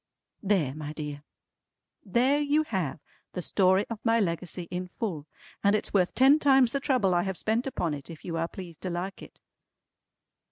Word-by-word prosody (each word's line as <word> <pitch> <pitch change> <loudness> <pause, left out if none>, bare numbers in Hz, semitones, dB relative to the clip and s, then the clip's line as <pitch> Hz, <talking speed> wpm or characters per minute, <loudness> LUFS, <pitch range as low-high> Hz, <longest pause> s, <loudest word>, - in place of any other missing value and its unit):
There 185 -10 +1
my 150 0 -6
dear! 150 -2 -6 0.8
There 250 +8 +2
you 295 +1 +2
have 185 - -2 0.3
the 180 - -3
story 190 +2 +3
of 230 -2 -5
my 230 0 +3
Legacy 175 -2 -2
in 180 +1 -3
full, 180 -7 -4 0.4
and 200 +1 +4
it's 210 - -1
worth 185 -3 +2
ten 275 +4 +6
times 270 -5 +5
the 275 - 0
trouble 255 -10 +2
I 175 - +3
have 190 -1 -3
spent 225 +4 0
upon 175 - -1
it 140 +1 -8
if 165 -2 -10
you 170 - -3
are 165 0 0
pleased 175 -3 -10
to 185 - -3
like 180 +3 -4
it. - - -13
190 Hz, 185 wpm, -28 LUFS, 170-230 Hz, 0.8 s, ten